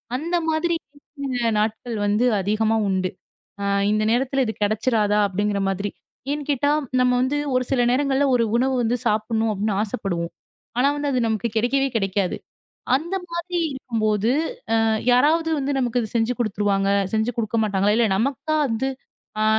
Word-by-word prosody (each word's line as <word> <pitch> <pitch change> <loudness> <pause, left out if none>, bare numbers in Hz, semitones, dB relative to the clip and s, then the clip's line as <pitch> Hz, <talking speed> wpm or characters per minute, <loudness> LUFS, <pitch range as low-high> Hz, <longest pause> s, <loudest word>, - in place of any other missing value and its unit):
அந்த 335 +6 -2
மாதிரி 335 +2 +1 0.8
நாட்கள் 220 +2 -2
வந்து 210 +4 +2 0.2
அதிகமா 215 +3 +1
உண்டு. 185 -1 0 0.5
அ - - -1 0.3
இந்த 215 0 +1
நேரத்துல 265 +2 +1
இது 220 - -2
கெடைச்சுறாதா 210 0 +2
அப்படிங்கற 205 +1 -1
மாதிரி. 200 +2 -2 0.4
ஏன்னுக்கேட்டா 290 -1 0 0.3
நம்ம 250 0 +3
வந்து 265 +3 0 0.2
ஒரு 255 - +2
சில 245 -2 +3
நேரங்கள்ல 275 +1 +2
ஒரு 230 - +2
உணவு 245 -2 +1
சாப்பிடணும் 220 +1 0
அப்படின்னு 205 0 -1
ஆசைப்படுவோம். 180 -5 -3 0.5
ஆனா 275 +3 +4 0.2
அது 250 - +1
நமக்குக் 220 0 -2
கிடைக்கவே 270 +4 +1
கிடைக்காது. 195 -1 -1 0.6
அந்த 330 +7 -1 0.2
மாதிரி 345 +1 -3
இருக்கும்போது, 220 -4 0 0.5
அ - - +2 0.3
யாராவது 315 +6 +3
வந்து 280 0 -1
நமக்குச் 240 -3 -1
செஞ்சு 230 +2 +2
குடுத்துருவாங்க. 200 -3 +1 0.2
செஞ்சு 220 +2 +1
குடுக்கமாட்டாங்களா? 210 -2 +1
இல 235 - +4
நமக்கா 275 +7 -1
வந்து 255 +3 -1 0.5
அ - - +3
230 Hz, 135 wpm, -23 LUFS, 210-265 Hz, 0.8 s, ஆனா